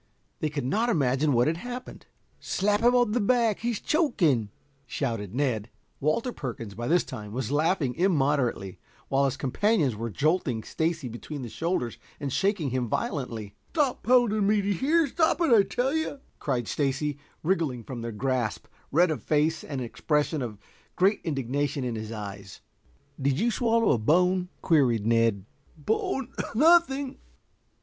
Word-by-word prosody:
They 155 - 0
could 145 -3 -3
not 220 - +1
imagine 145 - +2
what 120 -1 +3
had 160 +3 0
happened. 245 +6 -8 0.3
"Slap 205 +2 0
him 240 +1 +4
on 245 -3 +3
the 245 - +1
back, 230 -1 +2
he's 235 -2 -2
choking," 170 - +1 0.4
shouted 115 -7 -3
Ned. 120 -6 0 0.3
Walter 155 - 0
Perkins, 115 -6 -6
by 120 +4 -5
this 175 +2 +3
time, 105 -1 -8
was 125 0 -3
laughing 150 -3 +1
immoderately, 140 - +1 0.3
while 135 +1 +3
his 135 0 -1
companions 150 - +1
were 115 +2 -4
jolting 140 - 0
Stacy 160 -4 -2
between 130 +4 -7
the 120 - -6
shoulders 160 -5 -2 0.2
and 140 -4 -3
shaking 190 - 0
him 125 -2 -1
violently. 115 - -3 0.2
"Stop 285 -5 +1
pounding 230 -4 +3
me, 210 0 +3
d'ye 200 +1 +1
hear? 310 - +2
Stop 320 +5 +1
it, 330 -8 +3
I 220 - +8
tell 250 +7 -1
you," 315 -3 -2 0.2
cried 125 -5 -1
Stacy, 145 0 -1 0.2
wriggling 155 -9 0
from 120 0 -7
their 115 0 -4
grasp, 125 0 -1 0.3
red 170 +3 +4
of 155 - -3
face, 155 +1 +1
an 140 -3 -4
expression 150 +5 -1
of 115 -4 -5 0.4
great 195 +3 +3
indignation 140 -1 -1
in 125 -2 -2
his 110 0 -5
eyes. 100 -3 -8 0.6
"Did 135 +1 +1
you 235 +2 +2
swallow 230 0 +2
a 120 - +2
bone?" 180 +8 +2
queried 125 - +3
Ned. 115 -4 +2 0.3
"Bone 225 - -1 0.3
nothing." 285 -2 +4
150 Hz, 155 wpm, -27 LUFS, -, 0.6 s, I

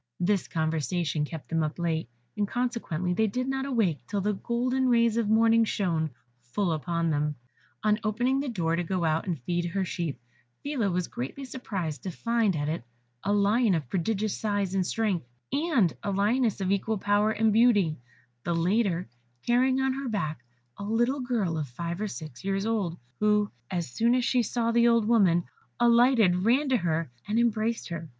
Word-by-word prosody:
This 190 +1 +1
conversation 160 -1 -1
kept 160 0 -8
them 165 -1 +1
up 155 0 -2
late, 165 -5 -1 0.3
and 205 -1 0
consequently 225 -8 -2
they 220 +4 +2
did 250 +5 -2
not 270 0 -2
awake 215 - +1
till 205 - -1
the 210 +2 0
golden 250 +5 0
rays 235 -2 +3
of 230 -3 0
morning 225 +1 +5
shone 170 -7 0 0.3
full 170 +10 -1
upon 165 +1 -1
them. 150 0 0 0.5
On 215 0 +3
opening 240 +5 +1
the 280 -1 -2
door 165 -7 0
to 175 - -1
go 180 +1 -1
out 160 +3 0
and 170 -5 -2
feed 175 +4 -1
her 190 +3 -1
sheep, 165 -7 -3 0.4
Phila 275 -8 0
was 180 -1 -1
greatly 135 - -6
surprised 195 - -4
to 190 - -4
find 230 +1 0
at 145 -1 -1
it 155 -5 -2 0.4
a 200 - 0
lion 205 +1 +3
of 150 -7 -3
prodigious 200 +3 0
size 205 -3 -1
and 190 -2 +1
strength, 200 - -1 0.2
and 280 - +2
a - - -3
lioness 210 +3 +1
of 190 0 0
equal 210 +2 0
power 205 +2 +2
and 220 0 +2
beauty, 210 - +4 0.4
the 170 0 -1
latter 180 +1 +1 0.4
carrying 255 +2 +3
on 265 0 +1
her 270 -1 -4
back 155 - -3 0.4
a - - -5
little 240 +6 +1
girl 220 -11 -1
of 150 - -3
five 170 +8 -5
or 215 - 0
six 155 -9 -8
years 195 +1 -1
old, 205 -7 -1 0.2
who, 210 -1 +2 0.2
as 170 -8 -3
soon 235 - +2
as 250 -1 +1
she 250 - +3
saw 230 +1 0
the 235 0 +4
old 230 -2 +4
woman, 190 -7 +4 0.4
alighted, 235 -5 +5
ran 245 +9 +2
to 260 - +4
her, 165 - -1 0.2
and 215 - 0
embraced 230 -2 0
her. 165 -2 -6
205 Hz, 185 wpm, -27 LUFS, 170-235 Hz, 0.5 s, morning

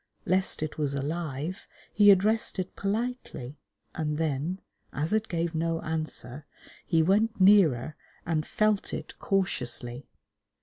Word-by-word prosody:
Lest 185 -3 +1
it 155 0 -5
was 140 -2 0
alive, 155 +3 -4 0.3
he 205 -1 +6
addressed 205 +4 +4
it 185 0 -4
politely, 200 - -3 0.3
and 150 -2 -2
then, 160 +3 -1 0.3
as 155 +7 -2
it 220 0 +1
gave 170 -1 -1
no 165 0 0
answer, 155 -4 -4 0.4
he 165 -2 +3
went 215 +6 +2
nearer 165 -9 +5 0.3
and 160 -2 0
felt 215 +4 0
it - - -7
cautiously. 125 -9 -2
165 Hz, 125 wpm, -28 LUFS, 150-195 Hz, 0.4 s, he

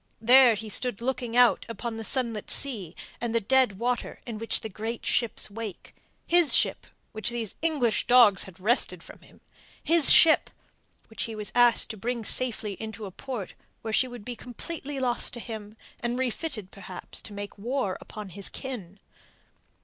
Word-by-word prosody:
There 245 +1 +6
he 220 +2 -7
stood 240 +1 0
looking 245 -1 -2
out 245 -1 +5
upon 230 0 -5
the 225 - -5
sunlit 230 -3 -1
sea 205 - 0 0.3
and 235 -1 -2
the - - +4
dead 250 -2 +2
water 240 +2 -2
in 225 -3 -6
the 225 0 -1
great 225 +3 -5
ship's 235 -3 +1
wake 215 -3 -8 0.3
his 345 -3 +5
ship, - - +1 0.2
which 220 +1 -2
these 235 -3 -3
English 290 -9 0
dogs 235 -6 +6
had 190 -1 -14
wrested 225 +7 0
from - - -13
him; - - -21 0.4
his 330 -2 +6
ship, 325 -1 +7 0.6
which 220 - -4
he 225 - -7
was 210 -1 -5
asked 245 -1 +4
to 220 - -9
bring 235 +2 -3
safely 225 -4 +2
into 220 -1 -6
a 195 - -8
port 245 -1 -6 0.3
where 220 -1 -4
she 260 - +3
would 245 -4 -10
be 245 - -5
completely 280 +3 -7
lost 250 -2 0
to 240 - -5
him 220 -2 -8 0.2
and 240 +1 -2
refitted 255 - -3
perhaps 185 -2 -8
to - - -11
make 205 0 -7
war 240 -3 -2
upon 210 -2 -9
his 195 +2 0
kin. 210 -8 -8
230 Hz, 170 wpm, -27 LUFS, 210-250 Hz, 0.6 s, ship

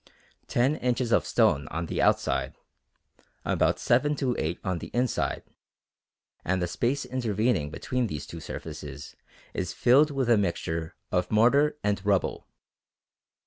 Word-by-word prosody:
Ten 135 +6 +2
inches 125 -1 0
of - - +3
stone 70 +2 +2
on 85 +2 -3
the - - -2
outside, - - +1 0.9
about - - +2
seven 145 +5 +2
to 130 -4 -1
eight 80 +3 -2
on 95 -3 -1
the - - -7
inside, 125 0 0 1.0
and 95 +1 0
the 90 - 0
space 125 +10 -1
intervening 110 - 0
between 125 +10 -2
these 75 -8 -5
two - - -8
surfaces 75 -3 -8 0.4
is 90 -1 -3
filled 140 +5 +5
with 135 -3 -1
a 115 -3 +5
mixture 85 -4 -2 0.2
of 90 0 0
mortar 140 +8 +4
and 100 -2 0
rubble. 100 -2 0
110 Hz, 140 wpm, -27 LUFS, 85-125 Hz, 1.0 s, filled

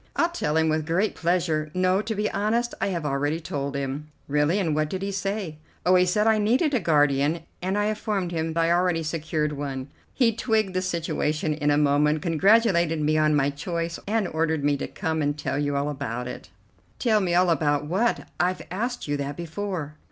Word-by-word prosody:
"I'll 335 - +2
tell 155 - -1
him 160 0 +3
with 155 0 0
great 185 +6 +1
pleasure. 165 -3 0
No, 185 +1 +2
to 220 +1 -3
be 210 +1 0
honest, 230 +4 0
I 195 - +2
have 170 -5 -2
already 145 +3 0
told 140 -3 -4
him." 140 +2 -3 0.2
"Really, 150 +5 +2
and 170 -6 0
what 155 0 0
did 190 +2 -4
he 200 - -2
say?" 195 -4 -3 0.3
"Oh, 180 - +5
he 180 0 +5
said 210 +4 +2
I 220 -1 +4
needed 255 +9 +2
a 255 - +3
guardian, 145 -1 +2 0.2
and 190 +3 -1
I 205 - +1
informed 210 -4 -1
him 165 -1 -1
I 165 0 +2
had 170 - +3
already 175 -2 +1
secured 155 -1 -2
one. 140 -2 -5 0.3
He 235 -4 +3
twigged 220 -4 0
the 185 - 0
situation 160 -3 -1
in 150 -1 0
a 145 - +3
moment, 150 +1 +2
congratulated 170 -1 +3
me 155 +1 +1
on 155 0 +3
my 140 0 +2
choice, 170 +3 -4
and 215 -2 +1
ordered 160 -2 -1
me 145 0 +3
to - - -4
come 160 -4 -2
and 145 0 0
tell 145 - -2
you 145 -1 0
all 140 +1 0
about 125 -4 -4
it." - - -8 0.5
"Tell 220 -4 +2
me 180 -3 0
all 180 0 +4
about 145 -2 +1
what? 195 +10 0
I've 180 +1 0
asked 240 +4 -3
you 145 0 0
that 140 0 -4
before." 170 -2 -4
165 Hz, 210 wpm, -25 LUFS, 150-195 Hz, 0.5 s, Oh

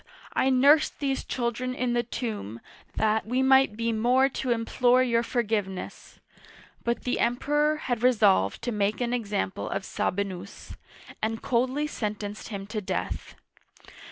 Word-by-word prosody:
I 265 - +2
nursed 280 +4 +4
these 275 -2 -1
children 250 +1 -2
in 250 -1 -1
the 240 - +2
tomb, 215 - -5 0.4
that 220 0 +1
we 255 +3 +1
might 265 -5 +4
be 230 0 0
more 250 +4 +3
to 265 -1 -4
implore 245 +2 +3
your 235 -2 +2
forgiveness! 215 -6 -3 0.6
But 235 0 -1
the 250 - -1
Emperor 295 +5 +1
had 245 -6 -3
resolved 210 - +3
to 240 - -1
make 210 -1 0
an 245 -1 -1
example 205 -5 -2
of 190 - -3
Sabi 200 +2 -1
nus, 195 0 -9 0.5
and 225 +1 -2
coldly 260 +4 +1
sentenced 210 -6 -4
him 200 -3 -6
to 215 +1 -4
death. 190 - -4
235 Hz, 145 wpm, -27 LUFS, 210-255 Hz, 0.6 s, nursed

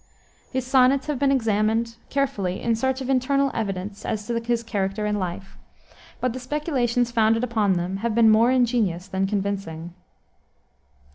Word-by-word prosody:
His 260 -1 -2
sonnets 260 +1 +4
have 295 -4 -2
been 275 -1 +3
examined 225 -1 +1
carefully 235 -10 -1
in 230 -1 +1
search 265 +3 -1
of 260 - -4
internal 275 +1 +2
evidence 200 -2 -4
as 210 -1 -3
to 235 +1 -1
his 235 0 -1
character 205 -1 -2
and 210 0 0
life, 185 +1 -6 0.6
but 255 -2 -1
the 255 - -5
speculations 250 -3 -1
founded 225 0 +2
upon 220 -5 +1
them 180 +2 -2
have 225 +2 -2
been 225 -2 +6
more 225 +3 +5
ingenious 230 -8 +1
than 190 0 -1
convincing. 195 -5 -3
230 Hz, 155 wpm, -24 LUFS, 200-255 Hz, 0.6 s, been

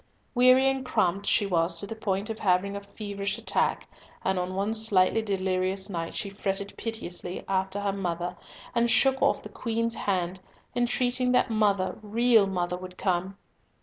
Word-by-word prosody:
Weary 255 +2 +6
and 270 -1 0
cramped 200 -5 0
she 210 - +3
was 170 -2 +1
to - - -3
the 225 - -6
point 205 -1 -2
of 220 - -6
having 195 +1 +1
a 200 - -5
feverish 200 -1 -4
attack, - - 0 0.4
and 190 -1 +1
on 180 +1 -3
one 200 +3 0
slightly 220 -1 +4
delirious 190 -1 -1
night 165 -2 -4
she 200 - -3
fretted 200 0 -3
piteously 185 -5 -4
after 190 +1 -1
"mother," 175 -2 -3 0.4
and 235 0 +2
shook 265 +3 +3
off - - +2
the - - -8
Queen's 230 -1 -2
hand, 185 -4 -1 0.4
entreating 250 +1 +1
that 250 - +3
"mother, 200 -4 +1
real 225 0 +3
mother," 180 -2 -2
would 185 0 -10
come. 190 0 -1
200 Hz, 160 wpm, -27 LUFS, 185-225 Hz, 0.4 s, Weary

